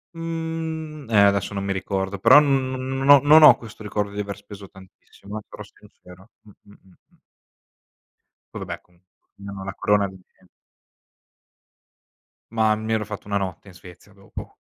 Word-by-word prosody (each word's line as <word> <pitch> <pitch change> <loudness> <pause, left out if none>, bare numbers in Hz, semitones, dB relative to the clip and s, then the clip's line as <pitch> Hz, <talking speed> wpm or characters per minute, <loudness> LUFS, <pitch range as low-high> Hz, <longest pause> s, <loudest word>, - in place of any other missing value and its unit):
Mhmm, 160 -3 -5
eh, 110 - +2
adesso 100 0 0
non 100 - -3
mi 100 0 -1
ricordo. 95 0 -3
Però 120 +8 +8
n 150 - +2 0.2
no 130 - -4
non 135 +1 -3
ho 145 0 +10
non 155 +2 +7
ho - - +10
questo 110 -2 -13
ricordo 105 -1 -3
di 105 - -7
aver 100 -1 -5
speso 100 -1 -12
tantissimo, 95 +2 -12
eh, - - -12
sarò - - -10
sincero 90 +4 -18
mh, 105 - -18
mh, - - -20
mh, 95 -2 -22 0.2
mh. - - -30 1.4
Poi - - -6
vabbè - - -7
comun 90 0 -31 0.4
no, 100 -1 -8
la 95 -1 -6
corona 105 0 +1
di 95 - -12
me 95 - -23 2.0
Mah, 110 -1 +2
mi 110 +1 -3
ero 110 -1 -1
fatto 105 0 -9
1 100 -1 -1
notte 95 -1 -5
in - - -15
Svezia 90 +3 -16
dopo. 100 0 -11
105 Hz, 175 wpm, -23 LUFS, 95-130 Hz, 2.0 s, ho